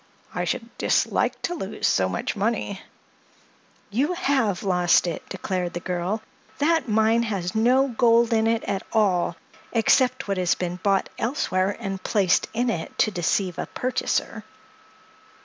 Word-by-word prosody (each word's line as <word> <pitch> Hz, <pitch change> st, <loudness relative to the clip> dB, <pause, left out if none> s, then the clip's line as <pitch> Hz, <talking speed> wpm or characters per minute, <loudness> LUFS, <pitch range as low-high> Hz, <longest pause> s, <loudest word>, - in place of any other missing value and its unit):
I -, -, -2 dB
should 230 Hz, 0 st, -4 dB
dislike -, -, +1 dB
to 350 Hz, -, -1 dB
lose 210 Hz, -, -4 dB
so 95 Hz, -1 st, +2 dB
much 95 Hz, -, -3 dB
money." 205 Hz, -1 st, -2 dB, 1.1 s
"You 275 Hz, -, +1 dB
have 265 Hz, -, 0 dB
lost 180 Hz, -3 st, +3 dB
it!" 170 Hz, -2 st, -3 dB
declared 180 Hz, -2 st, -3 dB
the 175 Hz, -, -3 dB
girl. 180 Hz, +4 st, -3 dB, 0.3 s
"That 315 Hz, -3 st, +1 dB
mine 220 Hz, +2 st, +3 dB
has 195 Hz, -6 st, -2 dB
no 250 Hz, +5 st, +3 dB
gold 235 Hz, 0 st, +3 dB
in 220 Hz, 0 st, +2 dB
it 230 Hz, 0 st, +1 dB
at 195 Hz, -1 st, -2 dB
all—except 220 Hz, +6 st, +1 dB
what 195 Hz, -1 st, -1 dB
has 180 Hz, -2 st, +2 dB
been 180 Hz, 0 st, -3 dB
bought 195 Hz, +1 st, +1 dB
elsewhere 200 Hz, -7 st, 0 dB
and 195 Hz, -4 st, -4 dB
placed 195 Hz, -4 st, +2 dB
in 235 Hz, +1 st, 0 dB
it 165 Hz, -7 st, -5 dB
to 215 Hz, -, +3 dB
deceive 180 Hz, 0 st, -1 dB
a -, -, -3 dB
purchaser." 255 Hz, 0 st, -2 dB
210 Hz, 145 wpm, -24 LUFS, 185-235 Hz, 1.1 s, lost